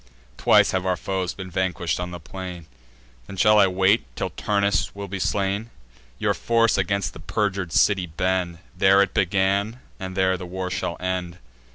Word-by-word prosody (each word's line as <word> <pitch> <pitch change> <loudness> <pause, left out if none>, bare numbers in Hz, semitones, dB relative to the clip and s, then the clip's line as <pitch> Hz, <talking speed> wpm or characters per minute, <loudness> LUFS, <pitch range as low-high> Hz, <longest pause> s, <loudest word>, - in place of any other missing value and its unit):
Twice - - +4
have 95 -1 -1
our 90 -1 0
foes 95 -1 -3
been 95 -1 -8
vanquish'd 90 -2 -1
on 90 0 -3
the 90 0 -7
plain: 90 0 -8 0.6
Then 95 - -9
shall 105 +2 +5
I 100 - +6
wait 95 +3 +3
till - - -3
Turnus 100 -4 0
will 100 0 -6
be 95 0 -5
slain? 100 +3 -1 0.5
Your - - +1
force 115 -1 +2
against 100 +1 -1
the - - -11
perjur'd 95 0 -2
city 95 0 +3
bend. 90 +1 -1 0.2
There 95 +1 +5
it 100 - -4
began, 100 +5 +1 0.2
and 95 0 -6
there 95 0 +2
the 90 - -7
war 90 +1 -4
shall 90 -2 -3
end. 90 -1 -3
95 Hz, 175 wpm, -23 LUFS, 90-100 Hz, 0.6 s, I